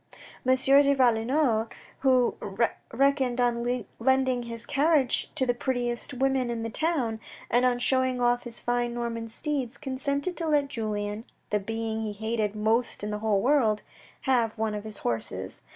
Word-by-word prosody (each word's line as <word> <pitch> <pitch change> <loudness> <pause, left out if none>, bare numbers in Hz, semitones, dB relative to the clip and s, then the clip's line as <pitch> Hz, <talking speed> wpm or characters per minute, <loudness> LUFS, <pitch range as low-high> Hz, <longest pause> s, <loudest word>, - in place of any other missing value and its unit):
M. 260 -1 +4
de 275 +2 +5
Valenod, 240 -1 +2 0.3
who 255 -3 +3 0.6
reckoned 265 -1 +2
on 240 -1 0
lending 260 0 +2
his 230 -1 -7
carriage 290 -3 +2
to 260 - +1
the 245 - +2
prettiest 245 +1 -2
women 265 -1 +1
in 230 -1 -3
the 230 - -4
town, 265 -7 0 0.3
and 245 +2 +4
on 245 -1 +1
showing 260 0 +1
off 245 0 +2
his 240 -1 -3
fine 240 0 -1
Norman 230 -1 -3
steeds, 265 +1 -3
consented 280 +5 -2
to 330 - -2
let 290 -2 +2
Julien 210 -3 -3 0.3
(the 210 - +2
being 225 +2 -3
he 215 -1 -3
hated 220 0 -2
most 220 +2 0
in 210 - -2
the 210 - -3
whole 210 -2 +1
world) 235 -5 +2 0.4
have 235 -4 +1
one 220 -1 -1
of 210 0 -5
his 215 -2 -6
horses. 110 -5 -4
240 Hz, 160 wpm, -27 LUFS, 225-265 Hz, 0.6 s, de